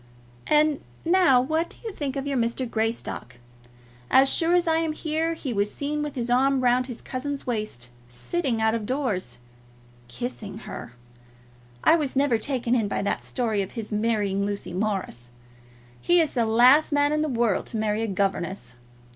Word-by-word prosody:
And 300 -1 +3 0.2
now 340 -7 +5
what 315 +6 0
do - - -8
you 445 -3 -5
think 280 -5 -4
of 275 0 -3
your 280 -1 -1
Mr. 235 +1 0
Greystock? 225 - -3 0.7
As 265 +1 +6
sure 340 +1 +3
as 350 -1 +2
I 320 0 +3
am 325 -1 0
here 320 +1 -1
he 270 -6 -4
was 205 0 0
seen 295 +1 -3
with 295 -1 -4
his 240 -2 -2
arm 265 +2 +3
round 250 0 +2
his 245 -3 -8
cousin's 275 +2 -4
waist, 210 - -3 0.2
sitting 230 - -2
out 220 0 +2
of 220 -2 -3
doors, 210 - -2 0.7
kissing 205 - -6
her! 120 - -7 0.9
I 330 - +6
was 290 -5 -2
never 265 -4 +2
taken 245 0 -1
in 225 -4 +2
by 200 - -2
that 200 - -1
story 225 -5 -1
of 195 - -5
his 225 -3 -5
marrying 210 -2 0
Lucy 200 -3 -4
Morris. 185 - -2 0.7
He 350 0 +4
is 320 -3 +2
the 235 -3 0
last 250 +8 +5
man 290 0 +3
in 305 - +1
the 310 - 0
world 235 -5 +1
to 225 - -4
marry 215 0 0
a 225 - -1
governess. 190 - -2
245 Hz, 180 wpm, -25 LUFS, 210-290 Hz, 0.9 s, As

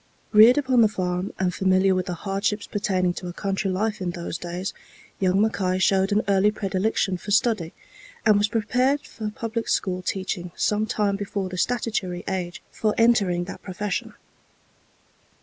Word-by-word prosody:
Reared 225 +4 +8
upon 260 -4 +3
the 220 - +6
farm, 180 -2 -2
and 185 -1 0
familiar 190 +1 +3
with 185 0 -1
the 180 - -3
hardships 200 +3 -2
pertaining 185 -4 0
to 180 - -7
a 175 - -6
country 195 +1 -2
life 210 +3 -1
in 180 - -1
those 170 -1 -5
days, 175 +2 -4 0.5
young 190 0 +2
Mackay 195 -4 +1
showed 190 +1 +2
an 210 +2 +2
early 200 +1 +4
predilection 195 -1 -1
for 205 - -10
study, 210 -6 +2 0.5
and 215 -2 +6
was 205 - +3
prepared 250 +6 +1
for 215 -2 -6
public 225 +1 -4
school 185 -2 0
teaching 185 -1 -3
some 210 +1 +1
time 205 -3 0
before 200 -1 -3
the 185 - -6
statutory 215 -7 -1
age 180 -2 -3
for 215 -1 -1
entering 200 -7 +3
that 190 - -8
profession. 205 +2 -4
195 Hz, 165 wpm, -24 LUFS, 185-215 Hz, 0.5 s, Reared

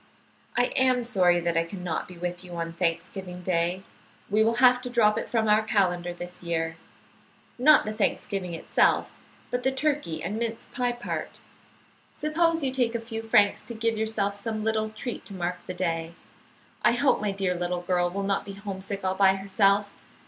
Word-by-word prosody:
"I 245 0 +2
am 255 -2 +3
sorry 185 -7 +3
that 170 0 -1
I 165 - +3
can 180 +2 -8
not 170 -3 -2
be 180 - -12
with 175 +1 -4
you 180 -1 -10
on 165 0 -3
Thanksgiving 180 +2 -3
Day. 180 +1 0 0.5
We 215 +1 +4
will 230 +1 +2
have 250 0 +5
to 250 - -5
drop 220 -4 +3
it - - -3
from 225 -2 +1
our 210 +1 +5
calendar 180 -5 +1
this 175 +1 -8
year; 165 -1 -2 0.8
not 300 +4 +6
the 215 - -3
thanksgiving 195 -4 -1
itself, 165 - +2 0.4
but 245 0 -1
the 265 - +1
turkey 275 - -1
and 200 +5 -3
mince 230 -1 -3
pie 245 -2 -1
part. 240 0 -5 0.7
Suppose 330 +1 +1
you 265 - 0
take 245 -3 0
a - - 0
few 225 0 -6
francs 220 -2 +3
to 235 - -7
give 225 0 0
yourself 215 -2 0
some 215 +1 -3
little 220 0 0
treat 220 +3 -6
to 200 - -7
mark 180 0 -3
the 185 - -4
day. 165 -2 -2 0.7
I - - +5
hope 255 0 +2
my 210 - 0
dear 195 -2 -1
little 175 0 -2
girl 175 0 +1
will 200 +3 -3
not 195 0 0
be 200 - -8
homesick 195 0 -6
all 185 0 +1
by 190 0 +4
herself. 200 +1 +2
200 Hz, 190 wpm, -27 LUFS, 180-230 Hz, 0.8 s, not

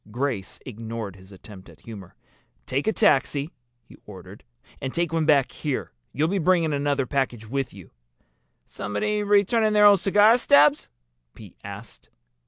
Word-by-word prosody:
Grace 120 -4 -4
ignored 115 -4 -7
his 95 +1 -17
attempt 95 0 -14
at - - -18
humor. 100 -5 -11 0.5
"Take 140 - -3
a - - +3
taxi," 150 -7 +1 0.3
he - - -18
ordered. 95 0 -12 0.4
"And 135 -2 -4
take 170 0 -2
one 160 -2 0
back 140 -4 +3
here. 145 -4 -4 0.2
You'll 150 +4 0
be 195 +3 -1
bringing 170 -2 +1
another 140 -1 -1
package 125 -4 -2
with 135 +2 -3
you." 95 -4 -14 0.7
"Somebody 210 - -3
returning 210 +2 +2
their 210 0 +5
old 200 -2 +7
cigar 210 +5 +4
stubs?" 145 -9 +3 0.5
Pete - - -14
asked. - - -11
140 Hz, 150 wpm, -24 LUFS, 110-185 Hz, 0.7 s, old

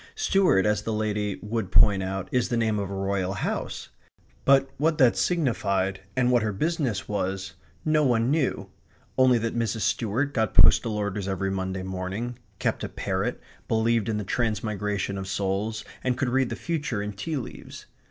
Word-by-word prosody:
Stuart, 195 - +3
as 105 -1 +2
the 110 - -3
lady 105 -2 -1
would 105 -3 -3
point 100 -2 +5
out, 95 0 -3
is 125 -1 +1
the 120 - 0
name 110 -2 +1
of 100 -1 -3
a 100 - -4
Royal 95 -1 -1
house; 105 - -3 0.6
but 135 0 +5
what 155 +1 +1
that 130 -6 +5
signified, 100 - 0
and 125 -1 +3
what 120 -1 +4
her 110 0 0
business 130 - -1
way, 95 -2 -1 0.5
no 155 -1 +3
one 120 -2 +2
knew; 150 -3 0 0.4
only 130 -2 +5
that 115 0 -2
Mrs. 115 -1 -1
Stuart 125 +8 0
got 110 -6 0
postal 110 -2 +5
orders 100 -1 -2
every 95 0 -1
Monday 95 -1 -3
morning, 95 +6 -4 0.2
kept - - -1
a - - -3
parrot, - - -2 0.3
believed 115 -1 +1
in 110 - 0
the 105 - -2
transmigration 105 -2 -1
of 95 - -5
souls, 100 +3 -2 0.2
and 125 -1 0
could 130 -1 0
read 130 0 +2
the - - -3
future 145 -11 -2
in 105 0 -4
tea 150 +10 -3
leaves. 130 - -8
110 Hz, 175 wpm, -26 LUFS, 100-125 Hz, 0.6 s, point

